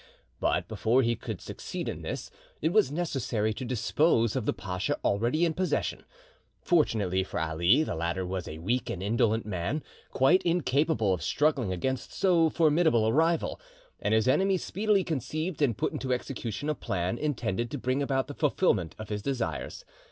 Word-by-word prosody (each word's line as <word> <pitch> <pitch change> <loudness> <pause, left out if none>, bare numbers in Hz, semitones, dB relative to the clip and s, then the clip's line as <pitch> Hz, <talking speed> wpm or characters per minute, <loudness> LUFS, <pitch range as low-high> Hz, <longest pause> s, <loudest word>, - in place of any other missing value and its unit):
But - - 0
before 125 +4 +2
he 115 0 +1
could - - -6
succeed - - -6
in - - -4
this, - - -5 0.3
it 160 +3 0
was 215 -10 +4
necessary 125 -9 -1
to 130 - -6
dispose 120 0 +2
of 125 -4 -2
the - - +4
pacha 90 -1 -3
already 120 +11 +2
in 165 - 0
possession. 185 +2 -1 0.5
Fortunately 105 - +2
for 95 - -4
Ali, 85 - +3
the - - -3
latter 85 +3 -2
was 90 0 -4
a 75 - -6
weak 115 +10 -1
and 95 - -4
indolent 110 +1 +1
man, 105 - -2 0.3
quite 170 +9 +4
incapable 150 - +1
of 90 - -3
struggling 145 -9 +1
against 125 +8 -3
so 170 -4 +3
formidable 155 -7 +3
a 110 - +2
rival; 165 - +1 0.4
and 110 - +1
his 110 +1 +2
enemy 190 +8 +3
speedily 205 +2 +1
conceived 155 +2 -3
and 120 -8 +2
put - - -1
into 130 - -3
execution 125 0 -3
a 155 - +2
plan 95 -4 -2
intended 120 -6 -1
to 145 - -4
bring 130 +2 -1
about 135 -1 0
the 145 - -7
fulfilment 135 - +1
of 110 -2 -8
his 105 -1 -3
desires. 130 +1 -3
125 Hz, 175 wpm, -28 LUFS, 105-155 Hz, 0.5 s, was